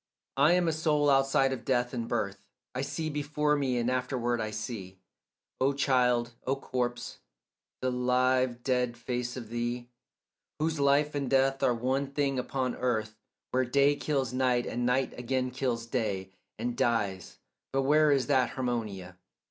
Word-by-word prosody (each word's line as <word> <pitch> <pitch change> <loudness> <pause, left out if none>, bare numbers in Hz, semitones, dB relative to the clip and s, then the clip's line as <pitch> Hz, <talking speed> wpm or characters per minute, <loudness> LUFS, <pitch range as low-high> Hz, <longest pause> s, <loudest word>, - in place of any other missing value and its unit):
I 145 +5 +5
am 180 -1 +2
a - - +3
soul 150 -2 +2
outside 135 0 +3
of 125 -3 -6
death 125 -1 0
and 115 -2 -3
birth. 100 -4 -2 0.3
I 130 - -2
see 155 +3 -3
before 150 0 0
me 135 -4 0
and 120 0 0
afterward 125 -2 0
I 110 - -2
see, 105 -3 -6 0.6
O 135 +2 +3
child, 125 -3 +2
O 135 - +2
corpse, 120 -2 -3 0.6
the 130 - +1
live 125 0 +1
dead 125 -2 0
face 125 +1 -3
of 115 -4 -7
thee, 120 +1 -3 0.7
Whose 155 0 -1
life 140 +2 +3
and 140 -3 -2
death 135 0 +2
are 125 - +3
one 130 +4 0
thing 140 -1 0
upon 130 -1 -2
earth 110 -3 -1 0.3
Where 130 0 +2
day 140 +3 +3
kills 135 -4 -1
night 125 -1 +2
and 120 0 -1
night 130 +1 +1
again 130 +1 -1
kills 125 -3 -2
day 105 -6 -2 0.3
And 120 0 -2
dies; 105 -7 -1 0.3
but 135 0 +1
where 150 +2 +4
is 135 -2 +3
that 130 -3 +3
Harmonia? 105 -8 -3
125 Hz, 160 wpm, -29 LUFS, 120-135 Hz, 0.7 s, I